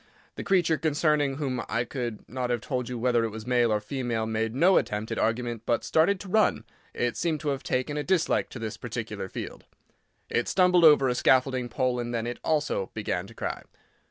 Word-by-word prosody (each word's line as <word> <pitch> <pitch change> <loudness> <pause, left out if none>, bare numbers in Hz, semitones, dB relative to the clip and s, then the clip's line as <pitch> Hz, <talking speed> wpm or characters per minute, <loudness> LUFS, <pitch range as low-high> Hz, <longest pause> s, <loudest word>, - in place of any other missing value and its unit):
The - - -6
creature 175 -5 +2
concerning 150 -3 +1
whom 135 -4 -2
I 115 - 0
could 120 -3 -5
not 125 0 -3
have 120 -1 0
told 125 -1 -3
you 125 - -4
whether 120 0 +2
it 115 - -1
was 110 0 -8
male 120 -2 +2
or 105 - +2
female 115 0 -2
made 110 +1 -2
no 180 +7 +5
attempt 105 +1 -1
at - - -2
argument, 115 0 -1
but 120 - +1
started 185 +5 +2
to 200 - -9
run; 215 +3 +2 0.3
it 120 0 -1
seemed 165 -3 -1
to 150 - -1
have 135 -1 -2
taken 130 +4 -2
a 150 - -1
dislike 185 -1 +1
to - - -8
this 110 -2 -5
particular - - -5
field. - - -7 0.6
It 120 - 0
stumbled 180 -2 +4
over 150 -3 +7
a 125 - +2
scaffolding 130 0 +2
pole, 125 0 0
and 120 0 -3
then 115 0 -2
it 120 0 -4
also 150 -11 0
began - - -2
to - - -15
cry. - - -4
125 Hz, 210 wpm, -27 LUFS, 120-150 Hz, 0.6 s, over